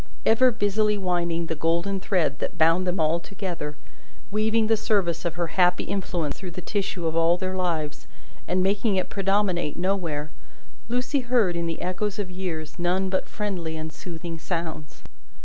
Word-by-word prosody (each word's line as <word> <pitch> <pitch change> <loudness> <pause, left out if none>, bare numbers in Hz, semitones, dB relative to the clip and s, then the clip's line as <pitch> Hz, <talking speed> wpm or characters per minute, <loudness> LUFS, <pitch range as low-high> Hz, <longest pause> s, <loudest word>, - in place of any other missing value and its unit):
Ever 255 +3 +6
busily 210 -1 +2
winding 170 -3 0
the 165 - -2
golden 170 +5 0
thread 175 -7 +1
that - - -3
bound 165 +3 +4
them 180 0 0
all 160 +2 +3
together, 170 -6 -5 0.5
weaving 220 +2 +2
the 225 +1 +4
service 195 -6 +1
of 170 -1 -1
her 175 0 0 0.2
happy 180 0 +4
influence 175 -6 -2
through 190 - -5
the - - 0
tissue 190 -2 -2
of 160 0 0
all 165 +1 +4
their 185 +1 -2
lives, 165 -5 -2 0.4
and 185 +1 +2
making 200 +2 +2
it 185 - 0
predominate 195 -5 +1
nowhere, 170 -6 -1 0.6
Lucie 250 +4 +1
heard 240 -8 +2
in 170 0 -1
the 165 - -3
echoes 190 +3 -1
of 200 -3 -3
years 175 -4 -4
none 185 +2 +1
but 190 - 0
friendly 180 -7 -3
and 155 0 -5
soothing 170 -1 -6
sounds. 160 -3 -4
180 Hz, 165 wpm, -26 LUFS, 165-200 Hz, 0.6 s, Ever